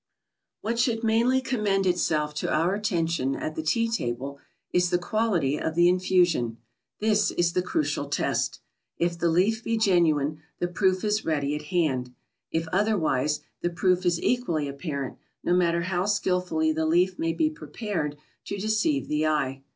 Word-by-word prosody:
What 230 +2 -2
should 235 -2 +1
mainly 235 +4 +3
commend 210 -7 0
itself 155 -4 +1
to - - -1
our 170 +4 +2
attention 165 -9 0
at 155 - -4
the 160 - -3
tea 230 +9 +1
table, 140 - -3 0.3
is 180 0 +3
the 175 - +2
quality 175 -7 0
of 160 - -2
the 175 0 +5
infusion. 180 -10 +2 0.4
This 210 -1 +2
is 175 -1 +1
the 180 - +2
crucial 300 - -1
test. - - -1 0.4
If 170 0 -1
the 170 - +2
leaf 205 +7 +2
be 230 0 0
genuine, 155 -8 +2 0.2
the 175 - -1
proof 185 +1 +1
is 210 0 +1
ready 145 -2 0
at 150 0 -4
hand. 130 -8 0 0.3
If 165 0 -2
otherwise, 160 -8 +1 0.2
the 175 - 0
proof 180 +1 +1
is 175 -2 +2
equally 170 - 0
apparent, 140 -1 -5 0.2
no 175 - +1
matter 170 -1 +2
how 185 +1 -1
skilfully 180 -5 +1
the 160 0 0
leaf 180 +3 +2
may 165 0 0
be 310 - +1
prepared 205 - -4 0.3
to 200 - -4
deceive 220 +9 0
the 150 +1 +1
eye. 135 -3 0
175 Hz, 165 wpm, -26 LUFS, 155-210 Hz, 0.4 s, the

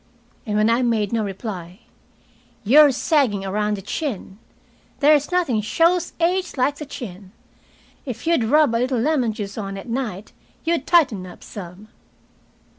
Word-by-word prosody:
And 210 - -1
when 215 +1 +3
I 230 +2 +2
made 225 -4 0
no 225 -1 +1
reply: 190 -2 -6 0.8
"You're 285 +7 +7
sagging 250 - +1
around 210 +2 -1
the 195 - -9
chin. 210 - -5 0.6
There's 295 +2 +4
nothing 330 -12 +1
shows 335 - +1
age 360 0 0
like 280 +3 +1
the 300 - -7
chin. 195 -8 -9 0.7
If 250 -1 -7
you'd 330 -8 +2
rub 295 +1 +4
a 230 - +1
little 255 0 0
lemon 255 -3 +1
juice 210 0 -6
on 195 -1 -5
at 195 - -9
night 230 -5 -4 0.3
you'd 330 -3 -1
tighten 245 - +3
up 180 - -13
some." 195 +2 -10
230 Hz, 150 wpm, -22 LUFS, 205-295 Hz, 0.8 s, You're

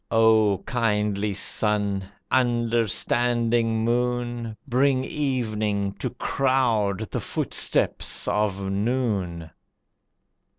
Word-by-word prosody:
O 110 -3 +3
Kindly 105 -3 0
Sun! 100 -1 +1 0.3
Understanding 120 -1 +1
Moon! 120 -1 -2
Bring 130 +1 +2
evening 110 -8 -2
to - - -2
crowd 115 -6 0
the - - -2
footsteps - - 0
of 100 -2 0
noon. 100 -6 -2
115 Hz, 75 wpm, -24 LUFS, 105-120 Hz, 0.3 s, O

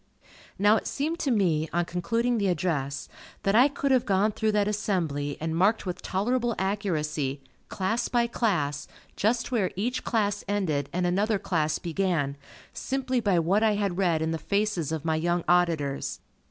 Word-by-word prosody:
Now 205 +3 +5
it - - -4
seemed 315 +4 -2
to 285 - 0
me, 170 -9 +1
on 175 0 +1
concluding 230 +8 0
the 200 - +1
address, 155 -6 -1 0.4
that 195 - +2
I 245 +5 +7
could 280 -1 -2
have 255 -2 +4
gone 200 +2 +3
through 215 0 0
that 205 -1 +2
assembly, 170 -9 -1
and 160 +1 -2
marked 200 +6 +2
with 180 -1 -4
tolerable 235 +4 0
accuracy, 155 -8 -1 0.3
class 225 +5 -1
by 240 -1 +2
class, 175 - -1 0.3
just 230 +4 0
where 210 -7 +1
each 235 +7 -2
class 205 -3 0
ended 165 -9 -1
and 180 +1 -1
another 200 +4 +1
class 160 -5 0
began, 170 -5 -1 0.4
simply 260 -1 -1
by 200 -5 +2
what 180 +6 +2
I 220 -2 +3
had 200 -3 -1
read 170 -4 +2
in 160 - -1
the 165 - -2
faces 200 -3 -1
of 160 -1 -3
my 160 -1 +1
young 175 +1 0
auditors. 165 -6 +1
190 Hz, 170 wpm, -27 LUFS, 160-215 Hz, 0.4 s, I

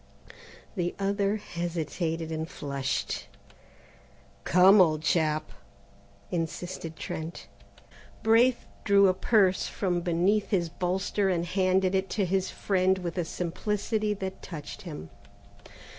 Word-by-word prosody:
The 175 -3 -1
other 200 +1 0
hesitated 170 -3 -3
and 160 0 -3
flushed. 140 -2 -3 1.2
"Come, 185 +3 +7
old 155 -3 +3
chap," 155 -2 +1 0.8
insisted 165 0 -4
Trent. 160 +1 -6 0.8
Braith 230 +3 +4 0.2
drew 200 -1 +5
a - - +3
purse 190 -1 +2
from 180 -3 -1
beneath 180 +5 +1
his 175 -5 +1
bolster, 190 +3 0
and 175 -2 0
handed 185 +1 +2
it 190 0 0
to 200 - +2
his 190 +1 0
friend 190 -1 +1
with 175 -2 -4
a 180 - 0
simplicity 210 +5 -2
that 190 -1 -6
touched 155 +3 -8
him. 80 - -8
185 Hz, 115 wpm, -28 LUFS, 165-195 Hz, 1.2 s, Come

